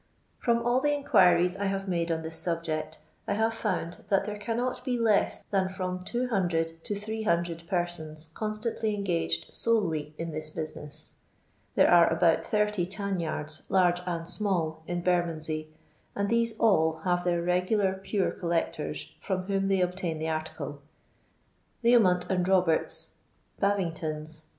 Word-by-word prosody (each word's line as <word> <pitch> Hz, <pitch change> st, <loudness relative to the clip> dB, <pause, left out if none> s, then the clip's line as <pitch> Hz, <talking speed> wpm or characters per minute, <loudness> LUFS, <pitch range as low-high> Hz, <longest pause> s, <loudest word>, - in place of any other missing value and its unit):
From 235 Hz, -1 st, +1 dB
all 240 Hz, +1 st, +3 dB
the 290 Hz, 0 st, +2 dB
inquiries 180 Hz, -10 st, +4 dB
I 200 Hz, +1 st, -2 dB
have 195 Hz, 0 st, -2 dB
made 170 Hz, -2 st, 0 dB
on 160 Hz, 0 st, -1 dB
this 160 Hz, 0 st, -4 dB
sub 170 Hz, -1 st, +2 dB
ject, 155 Hz, -1 st, -3 dB, 0.3 s
I -, -, +1 dB
have 225 Hz, +1 st, +1 dB
found 185 Hz, -6 st, -3 dB
that 195 Hz, -1 st, +3 dB
there 210 Hz, 0 st, -5 dB
cannot 235 Hz, +4 st, -2 dB
be 250 Hz, -2 st, 0 dB
less 220 Hz, -3 st, +2 dB
than 190 Hz, -2 st, +2 dB
from 185 Hz, -1 st, -4 dB
200 175 Hz, -9 st, -1 dB
to 205 Hz, -, -2 dB
300 175 Hz, -6 st, -1 dB
persons 160 Hz, -4 st, -2 dB
constantly 215 Hz, +1 st, -2 dB
engaged 165 Hz, -, -1 dB
solely 165 Hz, -10 st, 0 dB
in 165 Hz, 0 st, -4 dB
this 155 Hz, 0 st, -4 dB
business. 155 Hz, -2 st, -7 dB, 0.6 s
There -, -, +6 dB
are 170 Hz, -1 st, +6 dB
about 165 Hz, +4 st, +2 dB
80 210 Hz, -3 st, +2 dB
tanyards 170 Hz, -6 st, -2 dB
large 180 Hz, -2 st, +3 dB
and 170 Hz, -2 st, -3 dB
small 170 Hz, -7 st, -1 dB
in 175 Hz, 0 st, -2 dB
Bernondscy, 160 Hz, -3 st, 0 dB, 0.5 s
and 200 Hz, 0 st, 0 dB
these 230 Hz, -1 st, +2 dB
all 160 Hz, -8 st, +3 dB
have 175 Hz, 0 st, +1 dB
their 175 Hz, -1 st, +1 dB
regular 185 Hz, +3 st, +2 dB
Pure 195 Hz, +1 st, -1 dB
coUecton 75 Hz, -, -1 dB
from 185 Hz, -2 st, -2 dB
whom 195 Hz, 0 st, 0 dB
they 195 Hz, -1 st, +2 dB
obtain 180 Hz, -3 st, -1 dB
tJie 160 Hz, 0 st, -1 dB
article. 150 Hz, -2 st, -5 dB, 1.0 s
Leomont 200 Hz, -7 st, +5 dB
and 180 Hz, -1 st, 0 dB
Roberts's, 185 Hz, -4 st, +2 dB, 0.4 s
Baving 200 Hz, -4 st, +1 dB
tons'. 155 Hz, 0 st, -2 dB
180 Hz, 145 wpm, -28 LUFS, 165-205 Hz, 1.0 s, There